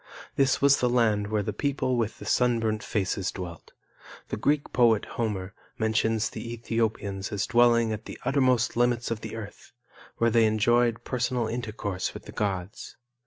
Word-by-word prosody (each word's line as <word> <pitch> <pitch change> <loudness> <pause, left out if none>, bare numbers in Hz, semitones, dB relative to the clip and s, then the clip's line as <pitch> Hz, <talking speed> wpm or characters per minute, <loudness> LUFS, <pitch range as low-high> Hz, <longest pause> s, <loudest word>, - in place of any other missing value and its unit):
This 135 0 +2
was 140 0 +6
the 125 - +2
land 110 -4 +2
where 105 0 0
the 105 - -3
people 135 +1 -1
with 115 -2 -1
the - - -10
sunburnt 115 -3 +1
faces 95 -2 -1
dwelt. 85 -3 -8 0.6
The - - -2
Greek 145 +7 0
poet, 115 -4 +4
Homer, 100 -5 -3 0.2
mentions 110 +1 +1
the 115 +1 -6
Ethiopians 110 -4 -2
as 100 -2 -1
dwelling 120 -1 +4
at 110 0 -5
the - - -8
uttermost 130 -3 +2
limits 120 -1 +1
of 110 -1 -3
the - - -6
earth, 105 -2 -10 0.4
where 115 0 +2
they 115 0 +5
enjoyed 115 +2 +2
personal 125 -1 -1
intercourse 110 -5 -4
with - - -9
the - - -9
gods. 95 -2 -4
115 Hz, 165 wpm, -27 LUFS, 105-120 Hz, 0.6 s, was